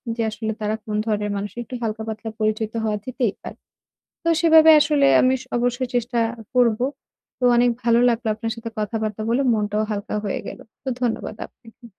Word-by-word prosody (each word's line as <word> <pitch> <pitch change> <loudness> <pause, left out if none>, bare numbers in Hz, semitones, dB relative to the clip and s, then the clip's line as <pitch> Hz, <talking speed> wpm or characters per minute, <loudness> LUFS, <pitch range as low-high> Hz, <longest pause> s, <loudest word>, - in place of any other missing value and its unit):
যে 230 - -2
আসলে 220 +1 -4
তারা 210 +1 0
কোন 210 -1 -3
ধরনের 210 -1 -1
মানুষ। 200 0 -4
একটু 245 - -13
হালকা-পাতলা 220 0 -4
পরিচিত 215 0 0
হওয়া 210 -1 0
যেতেই 250 -5 -1
পারে। - - -9 0.7
তো - - -3
সেভাবে 320 -1 +7
আসলে 290 -2 +3 0.2
আমি 255 0 +4
স - - -10
অবশ্যই 245 +1 0
চেষ্টা 240 0 0 0.4
করব। 235 -3 +3 0.6
তো 250 - +1
অনেক 245 0 +4
ভালো 235 0 +4
লাগল 235 0 -1
আপনার 225 +1 -4
সাথে 230 0 -7
কথাবার্তা 215 0 -2
বলে। 245 +4 +2
মনটাও 210 0 0
হালকা 205 0 -3
হয়ে 200 - -2
গেল। - - -8 0.2
তো 265 - -3
ধন্যবাদ 225 -3 -2
আপনাকে। 235 0 -19
225 Hz, 175 wpm, -22 LUFS, 215-245 Hz, 0.7 s, সেভাবে